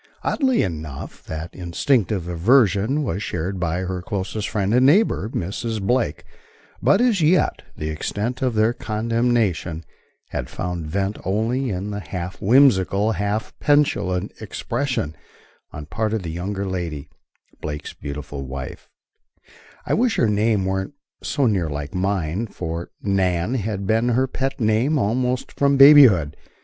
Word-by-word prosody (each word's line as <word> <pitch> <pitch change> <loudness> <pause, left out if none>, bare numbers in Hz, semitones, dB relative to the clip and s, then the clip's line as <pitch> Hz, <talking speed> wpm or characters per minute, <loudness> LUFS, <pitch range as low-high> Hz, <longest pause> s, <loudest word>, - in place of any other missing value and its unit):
Oddly 260 -4 +2
enough, 75 -6 -6
that 80 +2 -6
instinctive 90 +1 0
aversion 105 - +3
was 100 -6 -2
shared 90 0 -3
by 85 +1 -1
her 95 -1 -3
closest 100 +2 -3
friend 100 0 0
and 125 +1 +4
neighbor, 145 - +3
Mrs. 110 +3 -3
Blake; 105 - 0 0.6
but, 195 - +4
as 235 -7 +3
yet, 165 +4 +3 0.2
the 75 - -3
extent 105 +10 -3
of 125 -3 0
their 110 +2 +3
condemnation 110 -8 0 0.5
had - - -4
found 85 -3 -4
vent 100 +5 -2
only 115 +7 0
in 100 +1 -3
the 100 - -4
half 90 +1 -6
whimsical, 105 -3 +4
half 105 +1 -2
petulant 100 -11 +1
expression 125 - -3 0.6
on 75 0 -8
part 110 +7 -2
of 105 - -3
the 85 - -4
younger 95 +4 -3
lady 85 -6 -4 0.5
Blake's 75 -1 -5
beautiful 70 -1 -6
wife, 65 0 -7 1.0
"I - - 0
wish 240 0 +2
her 115 - +3
name 105 -1 +1
weren't 95 +7 -2 0.3
so 140 -2 0
near 95 -8 +1
like 75 +1 -5
mine," 95 +1 -1
for 85 -3 -5
"Nan" 95 0 +1
had 105 -5 -2
been 115 +4 +2
her 125 +2 +2
pet 135 +1 -3
name 115 +7 +2
almost 125 +2 0
from 140 0 +2
babyhood. 135 - +7
100 Hz, 140 wpm, -22 LUFS, 90-120 Hz, 1.0 s, babyhood